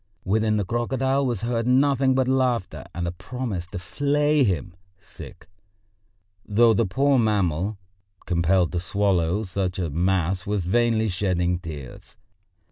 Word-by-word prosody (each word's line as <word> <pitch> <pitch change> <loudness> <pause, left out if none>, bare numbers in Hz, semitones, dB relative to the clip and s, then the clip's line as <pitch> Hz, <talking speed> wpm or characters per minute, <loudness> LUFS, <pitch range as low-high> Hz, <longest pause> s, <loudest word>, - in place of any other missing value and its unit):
Within 110 +2 +1
the 105 - -1
crocodile 130 +5 0
was 120 -6 -2
heard 115 0 -1
nothing 135 0 +3
but 130 -1 +1
laughter 130 -6 0
and 85 0 -2
a - - -2
promise 105 -2 -5
to 90 - -7
flay 145 - +1
him, 95 -4 -1 1.7
though 115 +2 +4
the 110 0 +1
poor 135 +7 +2
mammal, 100 -3 0 0.5
compelled 85 0 +2
to 90 - -1
swallow 95 0 0
such 95 -1 -3
a 85 -5 -2
mass, 90 +2 0
was 100 -4 -1
vainly 115 +2 +2
shedding 90 -2 0
tears. 75 -7 -10
100 Hz, 130 wpm, -24 LUFS, 90-125 Hz, 1.7 s, though